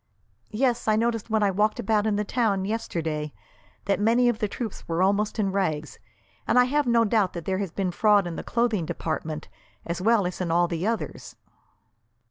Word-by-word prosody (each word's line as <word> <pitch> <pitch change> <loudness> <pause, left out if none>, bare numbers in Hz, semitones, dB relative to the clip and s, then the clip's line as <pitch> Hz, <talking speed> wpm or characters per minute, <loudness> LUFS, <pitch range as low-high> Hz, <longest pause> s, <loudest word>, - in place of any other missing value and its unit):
"Yes; 240 +1 0
I 215 - +4
noticed 230 0 -1
when 220 -1 +2
I 200 - +3
walked 210 +4 +1
about 215 -1 +1
in 210 - +1
the 210 - 0
town, 200 -4 0
yesterday, 160 -8 -3 0.5
that 200 - +1
many 235 +4 +3
of 230 -2 -1
the 215 - 0
troops 220 +1 -6
were 170 +2 +1
almost 205 +3 +1
in 200 -3 0
rags, 155 -6 -2 0.5
and - - +2
I 250 - +8
have 290 +2 0
no 235 -1 +4
doubt 210 -3 +1
there 185 +2 -3
has 200 -2 -2
been 185 +2 -2
fraud 205 +1 +3
in 170 -1 -4
the - - -4
clothing 225 -8 0
department, 155 -2 -4 0.4
as 170 +1 -3
well 220 -1 +3
as 180 +1 -4
in 180 - -2
all 175 +1 +3
the 170 +3 -2
others." 225 -1 -4
205 Hz, 195 wpm, -25 LUFS, 175-225 Hz, 0.5 s, I